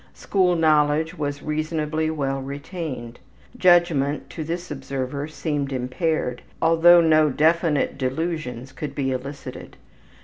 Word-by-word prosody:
School 185 -3 +1
knowledge 155 0 +2
was 145 -3 -4
reasonably 155 0 -1
well 135 -3 -2
retained. 140 -3 -6 0.4
Judgment, 170 -6 +3
to 160 - -5
this 170 +2 -5
observer, 135 0 -4
seemed 145 -3 -3
impaired, 130 +1 -1 0.2
although 165 +1 +6
no 155 -2 +4
definite 155 0 +1
delusions 135 -2 -3
could 140 +3 -6
be 135 -2 -1
elicited. 135 +3 -7
150 Hz, 110 wpm, -23 LUFS, 135-165 Hz, 0.4 s, although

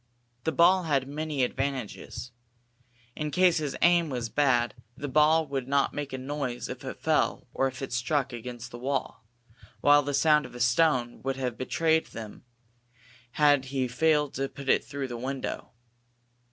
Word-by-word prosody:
The 160 - +2
ball 175 +4 +4
had 135 -4 +1
many 150 -1 -2
advantages. 130 -2 -4 0.8
In 150 0 -3
case 175 +2 +3
his 150 -3 -3
aim 175 -2 +4
was 120 -4 -3
bad, 125 -3 +2 0.2
the 145 - -4
ball 155 +3 +4
would 135 -3 -4
not 140 0 +1
make 145 -1 -4
a 130 - -4
noise 130 -2 -4
if - - -7
it - - -6
fell - - +1
or 135 - +1
if 130 +1 -7
it 135 - -5
struck 130 +2 0
against 120 +1 -7
the 120 - -8
wall, 130 -4 -3 0.5
while 145 0 +6
the 145 0 -2
sound 150 +1 +4
of - - -15
a - - -8
stone 120 0 +2
would 135 0 -2
have 125 -3 -3
betrayed 160 +5 +1
them 110 0 -9 0.9
had 145 -3 +4
he 130 -1 -1
failed 150 +2 +2
to 135 0 -2
put 140 -1 -8
it - - +4
through 140 -1 -5
the 120 -2 -6
window. 130 +2 -4
135 Hz, 170 wpm, -28 LUFS, 125-150 Hz, 0.9 s, while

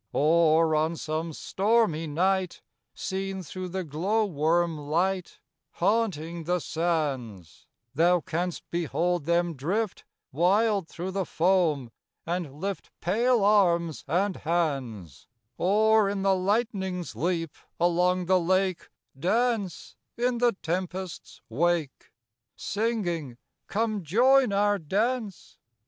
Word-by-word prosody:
Or, 160 +1 +4
on 155 +2 +1
some 160 +1 -3
stormy 195 -2 +1
night, 185 +4 0 0.3
Seen 190 0 -4
through 185 +4 -6
the 190 +1 -3
glow 185 +9 0
worm 165 0 +1
light 170 +5 -1 0.3
Haunting 170 -5 -1
the 180 +2 +1
sands, 140 - -3 0.3
Thou 175 +5 +4
canst 175 0 -3
behold 175 -1 -1
them 170 0 +1
drift 185 - -2 0.3
Wild 195 - +2
thro' 180 +3 -5
the 195 0 -1
foam, 160 -8 +1 0.3
and 170 -3 -3
lift 195 +2 -4
Pale 230 +5 +2
arms 170 -6 +3
and 185 +5 0
hands; 135 - -3 0.3
Or, 215 +2 +4
in 200 -1 -2
the 195 0 +4
lightning's 190 -2 -1
leap, 165 -1 -2 0.2
along 180 +1 +2
the 185 +1 +3
lake, 185 +1 0 0.3
Dance 220 - -1 0.2
in 240 0 0
the 240 -1 +3
tempest's 180 0 -4
wake. 160 +3 -1 0.4
Singing: 180 - -2 0.3
"Come 215 -1 -1
join 245 - +4
our 205 0 +2
dance! 210 +5 -2
180 Hz, 110 wpm, -27 LUFS, 160-200 Hz, 0.4 s, Or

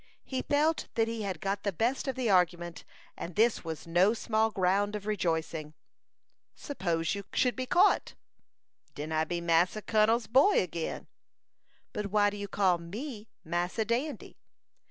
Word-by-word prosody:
He 260 -1 -3
felt 300 +3 +1
that 225 -1 +2
he 230 -1 -3
had 195 -3 -3
got 195 +1 -2
the 200 - -1
best 235 - -1
of 265 - -1
the 255 -2 -1
argument, 175 -3 +1 0.3
and 170 -1 -7
this 225 +1 +3
was 160 -2 -6
no 180 +6 +3
small 220 -1 +1
ground 200 +1 +1
of 205 -1 -6
rejoicing. 165 -6 -2 0.8
"Suppose 170 - -2
you 200 0 -4
should 250 -1 +2
be 255 -1 -4
caught?" 350 - +3 0.8
"Den 150 +2 -5
I 160 0 +1
be 175 +1 -3
Massa 170 +5 +2
Kun'l's 220 +1 +3
boy 275 - +5
again." 170 -2 -4 0.9
"But 210 -1 -3
why 205 0 +3
did 205 - -7
you 200 0 -5
call 190 -3 +2
me 215 - -7 0.2
Massa 175 +6 -1
Dandy?" 250 +7 -3
205 Hz, 155 wpm, -30 LUFS, 175-230 Hz, 0.9 s, boy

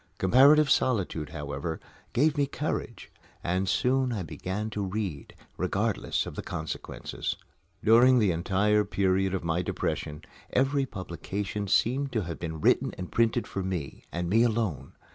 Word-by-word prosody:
Comparative 140 +9 +6
solitude, 95 - +1
however, 75 +2 -4 0.3
gave 145 +6 +3
me 140 -2 +1
courage; 140 -4 -4 0.3
and 90 +2 0
soon 130 +6 +2
I 105 -5 -2
began 95 +7 -4
to 105 -1 -2
read, 95 -6 -4 0.2
regardless - - 0
of - - -7
consequences. 80 -1 -4 0.5
During 120 +4 +6
the 105 -6 +3
entire 100 +5 +2
period 95 -1 +1
of 95 - -3
my 85 +1 0
depression, 75 -3 -3 0.3
every 135 +1 +2
publication 100 +2 -4
seemed 130 +7 +2
to 110 - +1
have 85 -1 -6
been 80 -2 -5
written - - +2
and 90 0 -6
printed 115 +1 +2
for 95 - -4
me, 90 -7 -4
and 85 0 -2
me 110 +6 +4
alone. 105 - 0
100 Hz, 145 wpm, -28 LUFS, 85-120 Hz, 0.5 s, Comparative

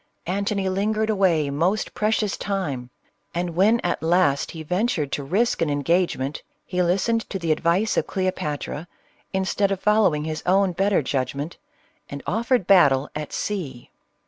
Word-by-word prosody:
Antony 200 +1 -1
lingered 215 +3 0
away 170 -8 +2
most 175 +9 0
precious 215 -1 0
time, 145 -12 -3 0.5
and 175 0 -1
when 210 +6 +4
at 175 - -1
last 160 -4 +2
he 160 -1 -7
ventured 180 - -1
to 145 - -2
risk 200 - +1
an 165 - +2
engagement, 145 -1 0 0.2
he 180 0 -1
listened 200 +6 +1
to 195 - -3
the 170 -3 -1
advice 170 +7 +1
of - - +1
Cleopatra, 175 -4 -3 0.4
instead 190 +1 0
of 195 - -1
following 205 -8 +3
his 155 0 -4
own 190 +1 +3
better 195 -1 +1
judgment, 140 +4 -3 0.5
and 140 0 -7
offered 230 +1 +1
battle 145 -8 +4
at 150 -1 -5
sea. 145 -12 -4
180 Hz, 145 wpm, -23 LUFS, 150-200 Hz, 0.5 s, when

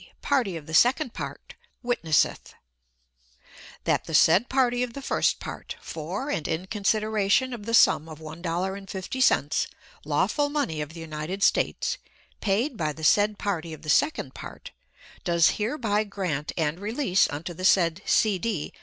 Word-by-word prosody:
party 240 - +1
of 155 - -10
the 160 - -9
second 245 - +4
part, - - -7 0.3
witnesseth: 170 - 0 1.3
That - - +1
the 160 - -2
said 180 +10 +5
party 250 -2 +2
of 250 -2 -2
the 275 - -7
first - - +1
part, - - -7
for 185 - -5
and 160 - -2
in 160 +3 -2
consideration 215 +4 +1
of 220 -3 -8
the 230 - +2
sum 160 -7 +5
of 155 - -9
$1.50, 185 - -1 0.4
lawful 290 -1 +1
money 280 - -1
of 150 +1 -6
the - - -8
United 160 +5 -4
States, - - +1 0.4
paid 225 +6 0
by 155 -3 -1
the 160 - -11
said 205 +5 +4
party 170 -5 -3
of 155 0 -11
the 155 - -6
second 310 - +2
part, - - -10 0.5
does 170 -2 +3
hereby 215 -2 0
grant 185 -8 -3
and 160 0 0
release 205 -2 +1
unto 155 +4 -5
the 185 - -8
said 175 -2 +3
C. 205 -4 +2
D. 185 -6 -3
195 Hz, 155 wpm, -26 LUFS, 160-230 Hz, 1.3 s, said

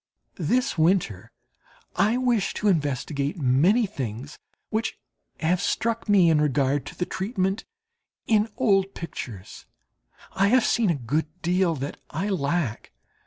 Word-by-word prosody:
This 255 -6 0
winter 160 - +1 0.6
I 215 +6 +2
wish 240 -6 +1
to 210 - -1
investigate 145 -2 0
many 160 - +3
things 135 - -6 0.3
which 220 0 -1 0.4
have 170 +2 +1
struck 230 0 -1
me 185 -5 +5
in 150 -1 +3
regard 140 -1 +1
to - - -9
the 180 - -1
treatment 190 0 -2 0.6
in 215 -1 +3
old 195 -6 +2
pictures. 115 - -8 0.7
I 195 +1 +3
have 250 +3 +4
seen 230 -4 +2
a 170 - +2
good 140 +5 -1 0.2
deal 175 -1 +2
that 140 0 -5
I 180 +7 -2
lack. 155 - -1
175 Hz, 130 wpm, -25 LUFS, 145-205 Hz, 0.7 s, me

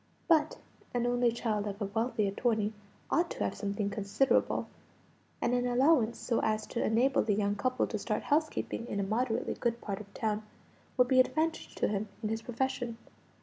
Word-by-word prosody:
But 315 -2 +3 0.4
an 240 0 +1
only 245 0 +3
child 215 -3 -1
of 200 0 -5
a 205 - -1
wealthy 220 +1 0
attorney 215 +1 0 0.4
ought 340 +1 +2
to - - -3
have - - 0
something 200 0 -2
considerable; 210 +6 +1 0.7
and 245 - +1
an 245 0 +2
allowance 245 -1 +3
so 235 - 0
as 215 0 0
to 235 - 0
enable 250 +5 +3
the 210 -2 +1
young 205 0 +1
couple 255 +5 +1
to 215 - -4
start 210 +1 -2
housekeeping 300 -5 0
in 200 - -2
a - - +1
moderately 225 +4 0
good 235 -1 -1
part 200 -2 -4
of 200 -1 -13
town, 215 -1 -1 0.6
would 250 -1 +5
be 260 0 +4
an 255 - +7
advantage 320 +1 -2
to - - +1
him 210 0 -2
in 215 - 0
his 225 0 -2
profession. 245 0 -2
230 Hz, 190 wpm, -31 LUFS, 210-250 Hz, 0.7 s, an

